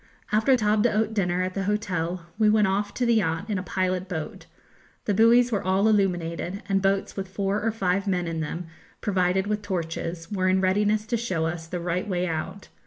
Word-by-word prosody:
After 220 +5 +4
table 210 -1 +2
d'hôte 220 -1 +1
dinner 180 -3 +1
at 185 0 -3
the 195 0 -2
hotel 185 -4 -2
we 215 -1 +5
went 215 0 +4
off 205 +1 0
to 250 - 0
the 235 - +4
yacht 190 -1 0
in 200 - 0
a - - -3
pilot 185 0 -1
boat; 160 -4 -5 0.6
the 205 - +1
buoys 235 +4 +5
were 205 - 0
all 190 +3 +2
illuminated, 185 -2 0
and 195 -2 +1
boats 195 0 0
with 195 -1 -4
four 195 +2 -1
or 225 - +1
five 195 -2 0
men 180 -2 0
in 165 -1 -3
them, 165 +3 -4 0.3
provided 190 -1 +1
with 210 0 -1
torches, 165 -2 -4
were 185 -2 +1
in 190 0 +3
readiness 210 +3 +2
to 235 +1 -1
show 185 -8 -1
us 165 0 -4
the 180 +1 -4
right 180 +3 -2
way 180 -2 0
out. 180 +4 -4
195 Hz, 205 wpm, -25 LUFS, 180-210 Hz, 0.6 s, we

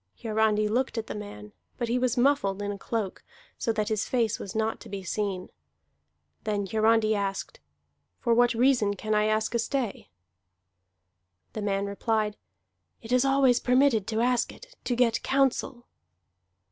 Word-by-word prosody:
Hiarandi 215 -1 +1
looked 245 +3 -1
at 225 - -2
the - - -6
man, 105 - -9 0.2
but 240 - -2
he 240 +2 +1
was 250 -1 0
muffled 240 -7 +2
in 205 - -2
a 200 - -5
cloak, 215 -4 -3 0.4
so 230 - 0
that 215 -1 -1
his 215 -2 -1
face 230 -3 +1
was 195 - -7
not 220 0 0
to - - -12
be 195 -1 -5
seen. 190 -1 -3 0.9
Then 205 -2 -1
Hiarandi 220 +2 +3
asked: 200 -2 -3 0.6
"For 235 - +1
what 240 0 +4
reason 235 -4 +3
can 215 +2 -2
I 210 0 +3
ask 215 +1 0
a 235 - +1
stay?" 240 -2 -2 1.4
The 215 - -4
man 200 -1 0
replied: 210 +1 -1 0.7
"It 225 - -8
is 250 0 +4
always 270 -3 +4
permitted 250 -5 +3
to 220 0 0
ask 245 0 +1
it, - - -15
to 245 - 0
get 235 -2 +2
counsel." 265 -2 0
220 Hz, 160 wpm, -27 LUFS, 210-245 Hz, 1.4 s, what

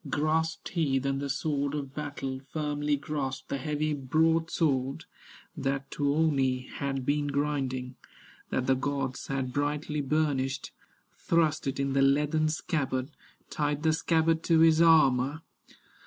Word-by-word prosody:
Grasped 160 +2 0
he 155 -6 +1
then 135 +1 -1
the 140 0 -3
sword 140 0 -1
of 140 -2 -5
battle, 140 -3 -4
Firmly 150 -1 0
grasped 135 -2 -4
the 140 - -2
heavy 150 +2 -1
broadsword 155 -1 +1 0.5
That 135 -2 -2
Tuoni 140 -3 +1
had 135 -2 -3
been 145 +1 +1
grinding, 135 -3 -2 0.5
That 130 - -1
the 130 - +4
gods 135 0 -2
had 135 -2 -2
brightly 150 +1 -1
burnished, 140 -2 -1 0.5
Thrust 160 -3 +1
it 135 - -2
in 140 -1 0
the 135 - +3
leathern 150 +3 +3
scabbard, 140 -3 -2 0.4
Tied 145 0 -1
the 160 -1 +3
scabbard 160 0 +2
to 165 -2 +4
his 160 0 +6
armor. 150 -2 +4
145 Hz, 130 wpm, -29 LUFS, 135-155 Hz, 0.5 s, his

